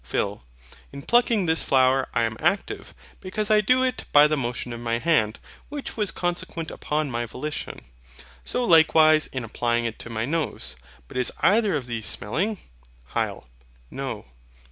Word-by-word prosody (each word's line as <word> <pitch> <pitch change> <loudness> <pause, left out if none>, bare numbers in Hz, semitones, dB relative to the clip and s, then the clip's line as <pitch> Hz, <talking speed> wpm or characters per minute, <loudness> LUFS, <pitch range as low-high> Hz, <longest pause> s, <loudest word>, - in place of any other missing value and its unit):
PHIL. 100 0 -2 0.5
In 140 0 -9
plucking 235 -4 +3
this 160 0 +2
flower 130 0 +3
I 115 - +3
am 115 -1 -1
active; 195 +5 -1 0.2
because 210 +3 -2
I 215 0 +6
do 255 +5 +3
it 255 -1 -1
by 145 0 +8
the 150 0 +2
motion 120 -2 -3
of 115 - -6
my 115 0 -1
hand, 115 -7 +2 0.3
which 290 -1 -6
was 210 -3 0
consequent 175 -2 -3
upon 150 -2 -2
my 120 0 -2
volition; 150 +6 -6 0.6
so 250 0 -1
likewise 160 -2 +6
in 130 -2 -5
applying 120 +1 -1
it 115 -1 -4
to - - -8
my 110 -1 -2
nose. 155 - -2 0.3
But - - -8
is 125 - +1
either 210 -2 +3
of 140 -4 -2
these 115 -3 -4
smelling? 190 - -2 0.6
HYL. - - -2 0.5
NO. - - -5
150 Hz, 165 wpm, -24 LUFS, 120-190 Hz, 0.6 s, by